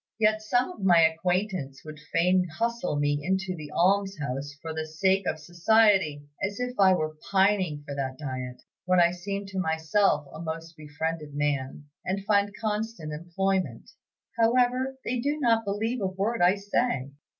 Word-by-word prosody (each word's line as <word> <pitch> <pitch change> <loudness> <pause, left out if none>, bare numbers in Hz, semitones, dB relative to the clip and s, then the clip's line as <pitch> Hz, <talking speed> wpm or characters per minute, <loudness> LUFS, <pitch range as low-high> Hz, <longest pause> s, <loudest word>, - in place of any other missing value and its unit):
Yet 215 0 +3
some 245 +8 +1
of 285 - -11
my 175 -3 +6
acquaintance 165 -3 0
would 155 -1 -9
fain 180 +2 +3
hustle 235 -8 -1
me 145 0 +1
into 190 +1 -1
the 155 -3 -8
almshouse 170 -7 0
for 160 +1 -6
the 155 0 -4
sake 190 +4 +1
of - - 0
society; 175 -2 +3 0.2
as 200 +3 -2
if 250 0 -2
I 190 -1 +7
were 155 -2 -3
pining 190 -6 +2
for 140 - -6
that 135 -2 -3
diet, 130 -3 -6 0.2
when 185 0 +3
I 170 0 +5
seem 200 +3 -4
to 195 -1 -5
myself 160 0 +1
a - - -8
most 165 0 -6
befriended 155 0 -4
man, 145 -1 -2 0.2
and 195 +2 -3
find 200 0 +3
constant 210 -7 -3
employment. 175 -4 -2 0.5
However, 250 +3 +2
they 250 +1 -1
do 290 +5 -1
not 230 -4 +2
believe 220 +4 -1
a 195 - +1
word 195 +5 -2
I 180 +2 +5
say. 200 - -1
185 Hz, 160 wpm, -27 LUFS, 155-205 Hz, 0.5 s, I